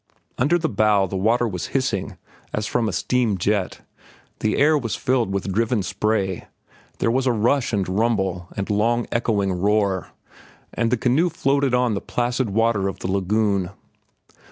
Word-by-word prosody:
Under 150 +7 +3
the 165 -1 -1
bow 105 -4 +2
the 95 - -5
water 115 +5 +2
was 90 -5 -4
hissing 115 -8 -2 0.4
as 105 - -1
from 115 0 0
a - - -2
steam 115 +2 0
jet, 100 +1 -1 0.6
the 110 - 0
air 155 +2 +4
was 120 -7 -1
filled 125 -5 0
with 95 0 -2
driven 115 0 +1
spray, 95 -1 -1 0.5
there 115 - +1
was 130 +2 +1
a - - +4
rush 120 +4 +1
and 100 -4 0
rumble 95 -3 0
and 100 +1 -2
long 115 +3 +1
echoing 105 -5 0
roar, 100 0 +1 0.7
and 115 - 0
the 125 - +1
canoe 135 +10 +2
floated 140 -4 +1
on 125 -2 +2
the 100 - -2
placid 125 0 -1
water 110 -1 +1
of 95 -1 -4
the 95 - -2
lagoon. 100 -1 +1
110 Hz, 165 wpm, -22 LUFS, 95-120 Hz, 0.7 s, air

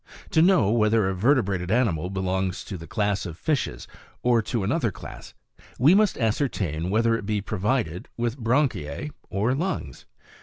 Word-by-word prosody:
To 160 - +4
know 165 - +4
whether 110 -2 +3
a 95 - 0
vertebrated 100 -4 +1
animal 95 -8 +1
belongs 95 -1 -2
to 100 - -7
the 85 -2 -9
class 105 -3 -1
of 85 -1 -8
fishes 150 - -2 0.4
or 120 -2 +4
to 110 0 -2
another 115 - 0
class, 85 - -11 0.4
we 145 +8 +6
must 210 0 +3
ascertain 100 - -1
whether 115 +3 +2
it 105 -3 -5
be 105 -1 0
provided 105 -2 -2
with 120 +2 -2
branchiae 125 - 0 0.2
or 105 +6 0
lungs. 150 - -4
110 Hz, 155 wpm, -25 LUFS, 95-125 Hz, 0.4 s, we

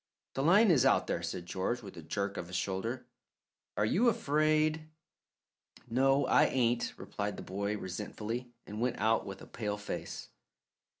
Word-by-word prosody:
"The 135 - -1
line 190 +8 +6
is 140 -7 +5
out - - +4
there," - - -1
said 85 +1 -4
George, 100 +7 -2
with 100 - -9
a 85 - -8
jerk 100 +5 -2
of 85 - -5
his 90 - -7
shoulder. 115 +7 -2 0.7
"Are 105 - +3
you 225 - +4
afraid?" 155 -2 +1 1.0
"No, 135 +3 +4
I - - +5
ain't," 120 -2 +1
replied - - -4
the - - -6
boy 100 +2 -2
resentfully, 105 +6 -5
and 105 +2 -6
went 125 0 0
out 110 +2 +2
with 95 - -7
a - - -9
pale 105 -3 -3
face. 105 - -6
115 Hz, 165 wpm, -32 LUFS, 100-135 Hz, 1.0 s, line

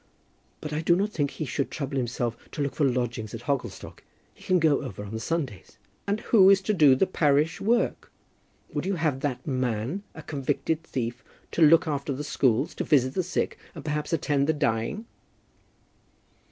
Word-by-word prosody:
"But 150 0 -5
I 155 - -1
do 170 +1 +4
not 200 +3 0
think 145 -7 0
he 155 - -5
should 135 +2 -2
trouble 140 -2 -4
himself 120 -2 -1 0.2
to 150 - -3
look 140 - -2
for 145 -3 +2
lodgings 120 -3 -2
at - - -8
Hogglestock. 135 -7 -4 0.3
He - - -18
can 185 - +3
go 155 -4 +3
over 105 -6 -6
on 105 +1 -8
the 110 - -3
Sundays." 130 - -4 0.3
"And 205 +2 0
who 195 -5 +6
is 195 0 +6
to 210 - +1
do 150 -8 +6
the 130 - +3
parish 150 -3 +1
work? 235 +3 0 0.6
Would - - -2
you 195 - 0
have 155 -5 0
that 130 -3 -3
man, 130 - -1
a 160 - -9
convicted 145 +2 -1
thief, 120 -5 -4 0.3
to - - -2
look 160 +1 +6
after 140 -1 -2
the 140 +3 -4
schools, 130 -3 +1
and - - -3
visit 130 -3 +4
the 185 - +1
sick, 180 0 -2 0.2
and 155 - -9
perhaps 150 -1 -2
attend 145 -3 +1
the 160 - +3
dying?" 145 - -1
145 Hz, 190 wpm, -26 LUFS, 130-165 Hz, 0.6 s, who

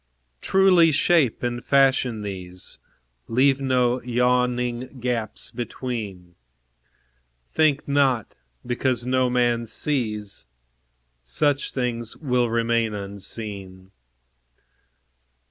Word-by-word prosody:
Truly 185 -4 +5
shape 150 -5 +2
and 120 0 -2
fashion 135 -5 +2
these; 90 -2 -7 0.5
Leave 135 +3 +3
no 125 -2 +1
yawning 125 +1 0
gaps 120 -3 -3
between; 110 -7 -5 1.2
Think 150 -2 +2
not, 135 -5 +1 0.3
because 120 0 0
no 130 0 +2
man 120 -1 +1
sees, 105 - -3 0.7
Such 140 - 0
things 120 -3 -2
will 125 -5 +1
remain 115 -1 +1
unseen. 100 -1 -7
120 Hz, 80 wpm, -24 LUFS, 110-130 Hz, 1.2 s, Truly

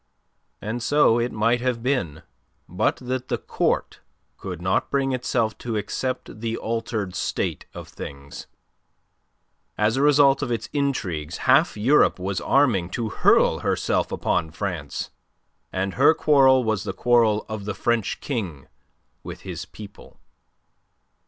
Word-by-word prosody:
And 110 +3 -3
so 145 -3 +3
it 120 +1 -1
might 115 +3 +1
have 125 -2 -1
been 125 - -1 0.4
but - - 0
that 130 0 -4
the - - -1
Court - - -1 0.4
could 90 -3 -6
not 95 +2 0
bring 135 -1 0
itself 120 -3 0
to 115 -3 -3
accept 130 +2 -4
the 115 0 -2
altered 110 -4 -3
state - - -3
of - - -8
things. 70 0 -9 1.3
As 110 +3 +1
a - - +1
result 145 -1 +5
of 145 - -2
its 115 -1 -3
intrigues 90 - -2
half 135 +3 +4
Europe 130 +8 +4
was 95 0 -3
arming 115 -11 +2
to 115 -2 -2
hurl - - +3
herself - - 0
upon 80 - -1
France, 85 -4 -4 0.6
and 95 0 -2
her 145 +4 +5
quarrel 135 -3 +5
was 110 -4 -1
the 100 -3 -4
quarrel 115 -2 +2
of 110 -2 -6
the 105 - -3
French 120 -3 -1
King 95 - -4 0.5
with - - -9
his - - -6
people. 105 -1 -13
115 Hz, 140 wpm, -24 LUFS, 100-130 Hz, 1.3 s, result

